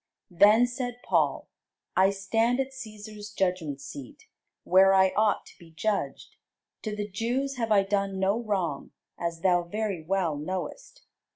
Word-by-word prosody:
Then 210 Hz, +7 st, +6 dB
said 245 Hz, 0 st, -5 dB
Paul, -, -, +1 dB, 0.5 s
I 190 Hz, +1 st, +5 dB
stand 225 Hz, +5 st, +1 dB
at 270 Hz, 0 st, -1 dB
Cæsar's 215 Hz, -4 st, -9 dB
judgment 180 Hz, -8 st, -1 dB
seat, 140 Hz, -2 st, -10 dB, 0.4 s
where 195 Hz, +1 st, +5 dB
I 190 Hz, 0 st, +5 dB
ought 215 Hz, -1 st, +2 dB
to -, -, -17 dB
be 170 Hz, -2 st, -15 dB
judged: 200 Hz, +6 st, -3 dB, 0.4 s
to 215 Hz, -2 st, -4 dB
the 205 Hz, 0 st, -3 dB
Jews 245 Hz, +7 st, -2 dB
have 230 Hz, -2 st, -2 dB
I 200 Hz, -2 st, +5 dB
done 195 Hz, -1 st, -1 dB
no 200 Hz, +4 st, +1 dB
wrong, 185 Hz, -10 st, -2 dB, 0.3 s
as 170 Hz, -1 st, -3 dB
thou 180 Hz, -2 st, +3 dB
very 195 Hz, 0 st, -3 dB
well 170 Hz, -2 st, 0 dB
knowest. 190 Hz, -, -6 dB
200 Hz, 150 wpm, -27 LUFS, 185-225 Hz, 0.5 s, Then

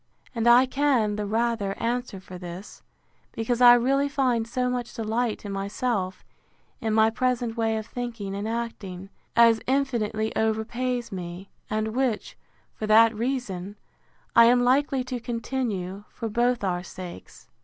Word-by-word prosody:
And 230 Hz, -1 st, 0 dB
I 245 Hz, +2 st, +7 dB
can 260 Hz, -6 st, +1 dB
the 210 Hz, -1 st, -3 dB
rather 225 Hz, -2 st, 0 dB
answer 240 Hz, -3 st, -2 dB
for 185 Hz, -1 st, -10 dB
this, 180 Hz, +2 st, -9 dB, 0.5 s
because 235 Hz, +2 st, -1 dB
I 245 Hz, -1 st, +10 dB
really 275 Hz, +4 st, +2 dB
find 255 Hz, -5 st, +1 dB
so 250 Hz, +1 st, -1 dB
much 245 Hz, -1 st, -3 dB
delight 225 Hz, -1 st, -2 dB
in 200 Hz, -, -4 dB
myself 195 Hz, -1 st, -2 dB, 0.5 s
in 225 Hz, -4 st, -2 dB
my 220 Hz, +1 st, +4 dB
present 245 Hz, -1 st, -1 dB
way 225 Hz, -1 st, 0 dB
of 220 Hz, -, -4 dB
thinking 230 Hz, -5 st, -5 dB
and 200 Hz, +2 st, -3 dB
acting, 205 Hz, -5 st, -5 dB, 0.2 s
as 230 Hz, -1 st, +6 dB
infinitely 235 Hz, -5 st, 0 dB
overpays 235 Hz, +3 st, -1 dB
me; 180 Hz, 0 st, -7 dB, 0.2 s
and 215 Hz, 0 st, -1 dB
which, 240 Hz, -1 st, -1 dB, 0.4 s
for 215 Hz, -, -5 dB
that 225 Hz, +1 st, +6 dB
reason, 210 Hz, -5 st, -3 dB, 0.6 s
I 230 Hz, -1 st, +9 dB
am 245 Hz, +1 st, +5 dB
likely 265 Hz, +1 st, +2 dB
to 250 Hz, -1 st, -4 dB
continue, 230 Hz, -5 st, -3 dB
for 225 Hz, -, -5 dB
both 240 Hz, +1 st, +1 dB
our 180 Hz, -2 st, 0 dB
sakes. 180 Hz, -, -10 dB
230 Hz, 145 wpm, -26 LUFS, 205-245 Hz, 0.6 s, I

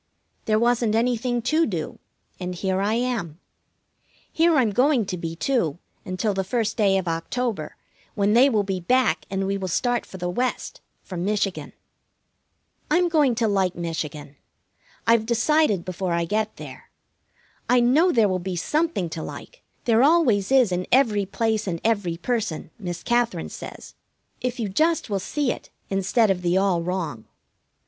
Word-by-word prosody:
There 215 Hz, -1 st, +2 dB
wasn't 235 Hz, -1 st, +2 dB
anything 240 Hz, +1 st, 0 dB
to 310 Hz, +6 st, +2 dB
do, 170 Hz, -8 st, -4 dB, 0.4 s
and 180 Hz, -1 st, -4 dB
here 190 Hz, +1 st, -1 dB
I 210 Hz, +3 st, +1 dB
am. 230 Hz, -10 st, -2 dB, 0.9 s
Here 330 Hz, 0 st, +4 dB
I'm 245 Hz, -7 st, +3 dB
going 255 Hz, +1 st, +3 dB
to 185 Hz, -, -3 dB
be, 165 Hz, -1 st, -5 dB
too, 175 Hz, -, 0 dB, 0.3 s
until 185 Hz, +3 st, -1 dB
the 190 Hz, 0 st, -1 dB
first 220 Hz, +2 st, -1 dB
day 200 Hz, -4 st, +3 dB
of 185 Hz, -2 st, -2 dB
October, 205 Hz, +8 st, -3 dB, 0.4 s
when 205 Hz, -1 st, +2 dB
they 255 Hz, +4 st, +6 dB
will 215 Hz, -5 st, +1 dB
be 190 Hz, -1 st, -2 dB
back, 220 Hz, -1 st, +1 dB
and 195 Hz, 0 st, -1 dB
we 195 Hz, +1 st, -1 dB
will 190 Hz, -, -3 dB
start 240 Hz, +7 st, 0 dB
for 190 Hz, -, -9 dB
the 180 Hz, -1 st, -3 dB
West, 245 Hz, +8 st, -2 dB, 0.2 s
for 185 Hz, -, -7 dB
Michigan. 195 Hz, +1 st, -2 dB, 1.2 s
I'm 350 Hz, +3 st, +3 dB
going 295 Hz, -7 st, +3 dB
to 230 Hz, -1 st, +1 dB
like 195 Hz, -3 st, +1 dB
Michigan. 155 Hz, -4 st, -5 dB, 0.7 s
I've 230 Hz, -1 st, +3 dB
decided 235 Hz, -, +2 dB
before 185 Hz, -1 st, -3 dB
I 170 Hz, 0 st, 0 dB
get 215 Hz, +4 st, -1 dB
there. -, -, -11 dB, 0.8 s
I 250 Hz, 0 st, +5 dB
know 285 Hz, +10 st, +4 dB
there 225 Hz, -7 st, +4 dB
will 185 Hz, -1 st, -1 dB
be 185 Hz, +1 st, -4 dB
something 300 Hz, -, 0 dB
to 160 Hz, -, -5 dB
like, -, -, -9 dB, 0.2 s
there 230 Hz, -2 st, +4 dB
always 265 Hz, -, +3 dB
is 255 Hz, -7 st, +5 dB
in 180 Hz, 0 st, -2 dB
every 220 Hz, -7 st, +3 dB
place 220 Hz, +1 st, -1 dB
and 170 Hz, -3 st, -2 dB
every 200 Hz, -7 st, 0 dB
person, 190 Hz, -6 st, -3 dB
Miss 175 Hz, -4 st, -5 dB
Katherine 235 Hz, -8 st, 0 dB
says, -, -, -9 dB, 0.5 s
if 250 Hz, 0 st, -3 dB
you 225 Hz, -, -1 dB
just 310 Hz, -, +1 dB
will 200 Hz, -, 0 dB
see 280 Hz, +6 st, -1 dB
it -, -, -8 dB, 0.2 s
instead 195 Hz, +3 st, +2 dB
of 180 Hz, -2 st, -1 dB
the 175 Hz, +1 st, +1 dB
all 190 Hz, -3 st, +2 dB
wrong. 170 Hz, -10 st, -3 dB
210 Hz, 165 wpm, -24 LUFS, 180-245 Hz, 1.2 s, they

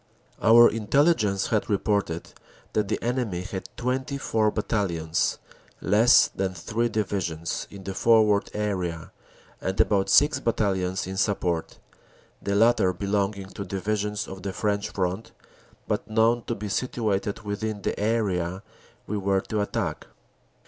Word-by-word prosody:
Our 115 Hz, +1 st, +8 dB
Intelligence 110 Hz, -, +2 dB
had 110 Hz, -2 st, 0 dB
reported 100 Hz, -5 st, -1 dB, 0.4 s
that 105 Hz, -2 st, +1 dB
the 110 Hz, -, 0 dB
enemy 120 Hz, -7 st, -1 dB
had 95 Hz, +1 st, -6 dB
24 125 Hz, -3 st, 0 dB
bat 105 Hz, 0 st, -3 dB
talions 85 Hz, -7 st, 0 dB, 0.4 s
(less 110 Hz, +5 st, +5 dB
than 95 Hz, -1 st, -3 dB
three 115 Hz, +7 st, -1 dB
Divisions) 95 Hz, -7 st, -2 dB
in 100 Hz, -1 st, -11 dB
the 95 Hz, -, -4 dB
forward 105 Hz, -1 st, +3 dB
area 90 Hz, -6 st, -3 dB, 0.5 s
and 95 Hz, 0 st, -3 dB
about 100 Hz, -2 st, +3 dB
six 145 Hz, +9 st, +5 dB
battalions 95 Hz, -5 st, 0 dB
in 95 Hz, +1 st, -6 dB
support, 90 Hz, -5 st, -1 dB, 0.6 s
the 100 Hz, -, -1 dB
latter 105 Hz, -4 st, +4 dB
belonging 100 Hz, 0 st, -2 dB
to 100 Hz, -, -6 dB
Divi 100 Hz, +2 st, -2 dB
sions 105 Hz, 0 st, -3 dB
on 95 Hz, 0 st, -8 dB
the 95 Hz, 0 st, -4 dB
French 100 Hz, 0 st, -1 dB
front, 95 Hz, +3 st, -3 dB, 0.5 s
but -, -, -2 dB
known 115 Hz, +2 st, +2 dB
to 115 Hz, -, -2 dB
be 105 Hz, 0 st, -5 dB
situated 105 Hz, -2 st, -1 dB
within 105 Hz, 0 st, -4 dB
the -, -, -2 dB
area 100 Hz, -4 st, 0 dB, 0.4 s
we 105 Hz, -, -3 dB
were 95 Hz, 0 st, +1 dB
to 105 Hz, +1 st, -2 dB
attack. 100 Hz, -, -3 dB
100 Hz, 135 wpm, -25 LUFS, 95-110 Hz, 0.6 s, Our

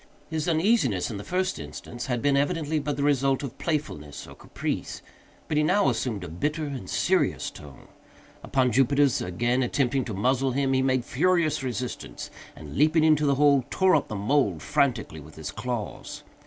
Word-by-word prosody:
His 160 Hz, 0 st, -2 dB
uneasiness, 160 Hz, -, +2 dB
in 105 Hz, -, -5 dB
the 100 Hz, -, -7 dB
first 185 Hz, -, -1 dB
instance, 80 Hz, -, -7 dB
had 120 Hz, -3 st, -2 dB
been, 145 Hz, -1 st, +3 dB
evidently, 155 Hz, +1 st, 0 dB
but 145 Hz, -1 st, -3 dB
the 140 Hz, -, -1 dB
result 135 Hz, -1 st, +2 dB
of 135 Hz, -, -7 dB
playfulness 75 Hz, -, -3 dB
or -, -, -12 dB
caprice, -, -, -5 dB, 0.4 s
but 150 Hz, -, -1 dB
he -, -, +4 dB
now 185 Hz, +6 st, +3 dB
assumed 110 Hz, -7 st, -2 dB
a -, -, -6 dB
bitter 150 Hz, -, -2 dB
and 135 Hz, -10 st, -6 dB
serious -, -, +1 dB
tone. 75 Hz, -2 st, -13 dB, 0.5 s
Upon 130 Hz, -2 st, +1 dB
Jupiter's 135 Hz, +2 st, +3 dB
again 120 Hz, +8 st, 0 dB
attempting 130 Hz, +1 st, +1 dB
to 110 Hz, -, -5 dB
muzzle 130 Hz, +5 st, +1 dB
him, 135 Hz, 0 st, +1 dB
he 130 Hz, -, +3 dB
made 130 Hz, -2 st, +1 dB
furious 170 Hz, +2 st, +1 dB
resistance, 125 Hz, -1 st, -5 dB, 0.2 s
and, 75 Hz, -2 st, -10 dB
leaping 155 Hz, +2 st, +4 dB
into 155 Hz, -2 st, +4 dB
the 140 Hz, -, +3 dB
hole, 140 Hz, -1 st, +4 dB
tore 185 Hz, -1 st, +3 dB
up 150 Hz, -, +1 dB
the 110 Hz, -, -5 dB
mould 100 Hz, -, +1 dB
frantically -, -, 0 dB
with -, -, -13 dB
his 80 Hz, -1 st, -6 dB
claws. 115 Hz, -1 st, -5 dB
135 Hz, 180 wpm, -26 LUFS, 120-150 Hz, 0.5 s, he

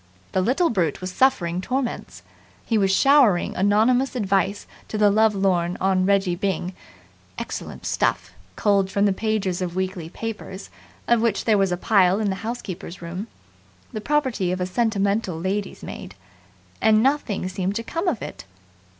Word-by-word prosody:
The 185 Hz, -, +1 dB
little 275 Hz, -, +2 dB
brute 170 Hz, -9 st, 0 dB
was 185 Hz, 0 st, -5 dB
suffering 180 Hz, -8 st, +2 dB
torments. 255 Hz, +3 st, -3 dB, 0.4 s
He 230 Hz, -, 0 dB
was 195 Hz, -3 st, +3 dB
showering 255 Hz, -4 st, +4 dB
anonymous 225 Hz, +7 st, +2 dB
Advice 200 Hz, -2 st, 0 dB, 0.2 s
to 215 Hz, -, -4 dB
the 210 Hz, -1 st, +4 dB
Lovelorn 195 Hz, -5 st, +2 dB
on 190 Hz, 0 st, +2 dB
Reggie 195 Hz, -2 st, +2 dB
Byng 185 Hz, -1 st, -2 dB, 0.6 s
excellent -, -, -6 dB
stuff, -, -, 0 dB, 0.2 s
culled 200 Hz, -2 st, +2 dB
from 200 Hz, +1 st, +1 dB
the 200 Hz, -, +3 dB
pages 200 Hz, -3 st, -1 dB
of 175 Hz, -1 st, -3 dB
weekly 185 Hz, -3 st, -3 dB
papers, 200 Hz, -2 st, -7 dB, 0.4 s
of 235 Hz, -1 st, +3 dB
which 225 Hz, -3 st, 0 dB
there 215 Hz, -3 st, +3 dB
was 195 Hz, -2 st, +2 dB
a 180 Hz, -, 0 dB
pile 190 Hz, -1 st, +3 dB
in 210 Hz, -2 st, 0 dB
the 190 Hz, -, -3 dB
housekeeper's 195 Hz, -6 st, -6 dB
room, 180 Hz, +6 st, -5 dB, 0.7 s
the 215 Hz, -, -4 dB
property 260 Hz, -9 st, 0 dB
of 185 Hz, -, -2 dB
a 180 Hz, -, 0 dB
sentimental 200 Hz, -3 st, 0 dB
lady's 195 Hz, +3 st, -3 dB
maid -, -, -8 dB, 0.7 s
and 220 Hz, 0 st, +4 dB
nothing 265 Hz, -9 st, 0 dB
seemed 190 Hz, +1 st, -2 dB
to 230 Hz, -, -2 dB
come 330 Hz, -, -3 dB
of 285 Hz, -, 0 dB
it. 95 Hz, 0 st, -8 dB
200 Hz, 160 wpm, -23 LUFS, 185-225 Hz, 0.7 s, showering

